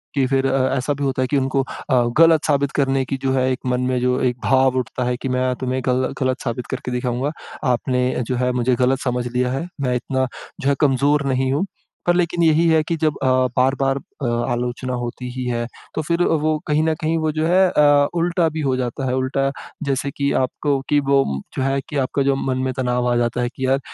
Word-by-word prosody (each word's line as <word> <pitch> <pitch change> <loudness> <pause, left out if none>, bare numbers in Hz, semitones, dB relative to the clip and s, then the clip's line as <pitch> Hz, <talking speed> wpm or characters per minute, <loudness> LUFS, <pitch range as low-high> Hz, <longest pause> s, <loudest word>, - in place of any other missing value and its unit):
कि 135 -2 +3
फिर 135 0 +1
अ, 130 0 +1
ऐसा 130 +3 0
भी 140 0 -5
होता 135 -1 0
है 130 - +1
कि 140 - +1
उनको 135 +1 +1
अ, 130 -1 0
गलत 165 -1 +5
साबित 140 -1 +1
करने 135 -1 +2
की 135 - -3
जो 135 - +1
है 130 0 +2
एक 130 - -2
मन 125 0 0
में 125 - +1
जो 125 0 +1
एक 125 -1 +1
भाव 130 -1 +3
उठता 125 +1 -3
है 125 0 -1
कि 135 - -2
मैं 130 0 +1
तुम्हें 130 +1 -2
गल 130 0 +1
गलत 130 0 0
साबित 120 0 -3
करके 125 - -4
दिखाऊँगा। 125 +3 -1 0.4
आपने 125 +1 0 0.2
जो 125 - -1
है 125 0 +1
मुझे 125 0 +1
गलत 130 +2 +2
समझ 125 -1 -1
लिया 125 +1 0
है। 135 +7 -3
मैं 125 -2 0
इतना 130 +1 -1 0.3
जो 135 - +1
है 140 - +3
कमजोर 140 +1 +3
नहीं 130 0 0
हूँ। 155 +7 0 0.4
पर 175 - +5
लेकिन 175 -1 +1
यही 160 +1 +4
है 160 -1 +4
कि 165 +2 -2
जब 155 -1 0
अ, - - +2 0.3
बार-बार 135 +1 +2
अ, 140 - -8 0.3
आलोचना 125 +1 -2
होती 125 +1 -4
ही 130 0 -4
है 120 -1 -1 0.3
तो - - 0
फिर 170 +3 0
वो 155 -1 +1
कहीं 150 +1 +2
ना 160 0 +2
कहीं 160 +1 +1
वो 155 -1 0
जो 155 +1 -1
है 185 +1 +4
अ, 145 -4 +4
उल्टा 170 0 +2
भी 155 0 -4
हो 135 -2 +1
जाता 130 +1 -3
है। 125 - 0
उल्टा 135 +1 0 0.3
जैसे 140 -1 -1
कि 140 0 -1
आपको 135 +2 0
कि 145 - +4
वो 140 -1 +3 0.3
जो 130 - 0
है 135 +1 +1
कि 150 - -3
आपका 135 +1 0
जो 135 0 +2
मन 135 -1 -1
में 130 - 0
तनाव 125 -1 0
आ - - +2
जाता 120 +1 0
है 120 - 0
कि 130 - -2
यार 135 +1 +2
135 Hz, 235 wpm, -21 LUFS, 125-145 Hz, 0.4 s, गलत